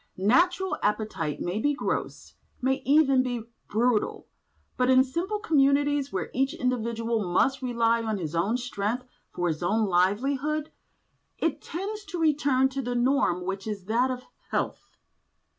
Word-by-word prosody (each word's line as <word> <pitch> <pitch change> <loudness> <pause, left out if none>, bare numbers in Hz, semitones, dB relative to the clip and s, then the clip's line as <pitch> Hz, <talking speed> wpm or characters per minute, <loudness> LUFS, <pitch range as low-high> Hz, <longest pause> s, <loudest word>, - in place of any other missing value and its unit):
Natural 355 - +2
appetite 210 -8 -1
may 180 +4 -2
be 290 +4 +1
gross, - - -3 0.3
may 265 +1 0
even 275 -2 +5
be 245 -3 -3 0.2
brutal, 225 +1 0 0.5
but 250 0 +1
in 260 0 +6
simple 340 +11 -2
communities 285 -6 +2
where 185 - -3
each 270 +1 0
individual 230 -2 -1
must 270 +9 +2
rely 235 -2 +1
on 220 -2 -2
his 160 -4 -4
own 195 +8 +1
strength 245 0 -3 0.2
for 175 - -2
his 160 -1 -2
own 215 +5 +2
livelihood, 265 +12 +1 0.7
it 325 -3 -1
tends 405 +5 -5
to 360 - -6
return 285 -4 +3
to 265 -2 -4
a - - -2
norm 240 -8 +2
which 195 +2 -4
is 205 -3 -5
that 235 +5 +2
of 250 -1 -4 0.3
health. - - -2
250 Hz, 145 wpm, -27 LUFS, 215-280 Hz, 0.7 s, in